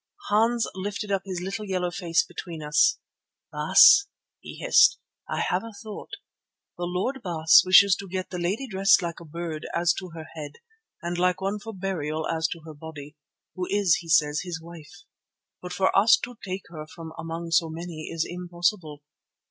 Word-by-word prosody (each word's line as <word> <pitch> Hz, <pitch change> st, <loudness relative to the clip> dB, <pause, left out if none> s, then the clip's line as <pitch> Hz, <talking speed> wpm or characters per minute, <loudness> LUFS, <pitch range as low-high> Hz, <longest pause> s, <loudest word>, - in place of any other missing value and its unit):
Hans 225 Hz, +3 st, +2 dB
lifted 200 Hz, +2 st, -5 dB
up 195 Hz, -1 st, +1 dB
his 185 Hz, -2 st, -4 dB
little 195 Hz, +4 st, -4 dB
yellow 185 Hz, -3 st, -2 dB
face 175 Hz, -2 st, +1 dB
between 165 Hz, -3 st, -8 dB
us. 150 Hz, +1 st, +3 dB, 0.5 s
"Baas," 395 Hz, +1 st, +6 dB, 0.3 s
he -, -, -10 dB
hissed, -, -, +5 dB, 0.3 s
"I -, -, -1 dB
have -, -, 0 dB
a 230 Hz, -1 st, -9 dB
thought. 210 Hz, 0 st, -9 dB, 0.7 s
The 175 Hz, -, -4 dB
Lord 190 Hz, +10 st, -2 dB
Baas 165 Hz, -3 st, +5 dB
wishes 185 Hz, +1 st, +6 dB
to 195 Hz, -, -8 dB
get 185 Hz, 0 st, -4 dB
the 180 Hz, -, -4 dB
lady 195 Hz, +10 st, -1 dB
dressed 195 Hz, -2 st, +4 dB
like 170 Hz, -1 st, -4 dB
a 170 Hz, -, -12 dB
bird 165 Hz, 0 st, -6 dB
as 170 Hz, 0 st, +3 dB
to 185 Hz, -1 st, -9 dB
her 160 Hz, -1 st, -8 dB
head 150 Hz, -2 st, -7 dB, 0.5 s
and 175 Hz, +1 st, -3 dB
like 180 Hz, 0 st, +2 dB
one 195 Hz, +2 st, -2 dB
for 225 Hz, +2 st, -8 dB
burial 160 Hz, -6 st, -3 dB
as 160 Hz, 0 st, 0 dB
to 165 Hz, -, -7 dB
her 160 Hz, -, -9 dB
body, 150 Hz, -1 st, -10 dB, 0.4 s
who 185 Hz, -1 st, -4 dB
is, 200 Hz, -4 st, +3 dB
he 170 Hz, -, -10 dB
says, 150 Hz, -1 st, +3 dB
his 175 Hz, -3 st, -5 dB
wife. 170 Hz, +3 st, -13 dB, 0.6 s
But 180 Hz, -, -7 dB
for 190 Hz, +1 st, +1 dB
us 205 Hz, +4 st, +6 dB
to 245 Hz, -1 st, -6 dB
take 190 Hz, 0 st, -5 dB
her 155 Hz, -2 st, -8 dB
from 160 Hz, 0 st, -10 dB
among 165 Hz, +1 st, -5 dB
so 165 Hz, 0 st, +3 dB
many 160 Hz, -1 st, -7 dB
is 165 Hz, -1 st, -1 dB
impossible. 175 Hz, -3 st, -3 dB
175 Hz, 180 wpm, -25 LUFS, 160-195 Hz, 0.7 s, Baas